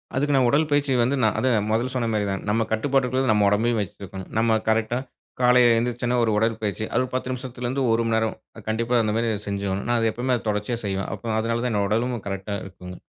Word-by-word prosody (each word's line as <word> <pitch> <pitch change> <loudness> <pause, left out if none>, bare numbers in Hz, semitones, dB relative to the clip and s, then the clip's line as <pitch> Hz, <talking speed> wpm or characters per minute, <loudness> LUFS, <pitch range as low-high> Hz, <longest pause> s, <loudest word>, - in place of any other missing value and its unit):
அதுக்கு 145 +2 +1
நான் 130 -2 +4
உடல் 150 +4 +2
பயிற்சி 145 -1 +1
வந்து 130 +4 +1
நா - - +5
அத 130 - +1 0.2
முதல்ல 120 +4 0
சொன்ன 120 -2 0
மாரி 105 -1 0
தான். 95 0 -2
நம்ம 110 +2 +2
கட்டுப்பாட்டுக்குள்ள 130 +2 +1
நம்ம 105 -1 +3
உடம்பையும் 115 +3 +1
வச்சி 100 +1 -6
இருக்கணும். 95 0 -8
நம்ம 110 0 +3
கரெக்ட்டா 110 +2 +1 0.4
காலையில 125 -1 +6
எழுந்திருச்சோனே 120 +1 0
ஒரு 115 - +2
உடல்பயிற்சி. 110 -1 -1
அது - - +2
ஒரு 130 - -6
10 130 0 -2
நிமிசத்திலருந்து 130 +1 -3
1 115 +1 +2
மணி 115 - +1
நேரம். 110 0 0 0.3
கண்டிப்பா, 115 +2 0
அந்த 105 -1 0
மாரி 115 0 +1 0.2
செஞ்சாவணும். 100 -1 -2
நான் 120 -1 +2
அது 115 0 +2
எப்பவுமே 125 +2 0
தொடர்ச்சியா 105 +3 -1
செய்வேன். 95 -1 -2
அப்போ 110 +3 -3
அதனால 115 +1 -1
தான் 125 - 0
என்னோட 100 -1 +1
உடலும் 115 +1 -1
கரெக்ட்டா 100 +1 -4
இருக்குங்க. 90 -1 -10
115 Hz, 210 wpm, -24 LUFS, 105-125 Hz, 0.4 s, காலையில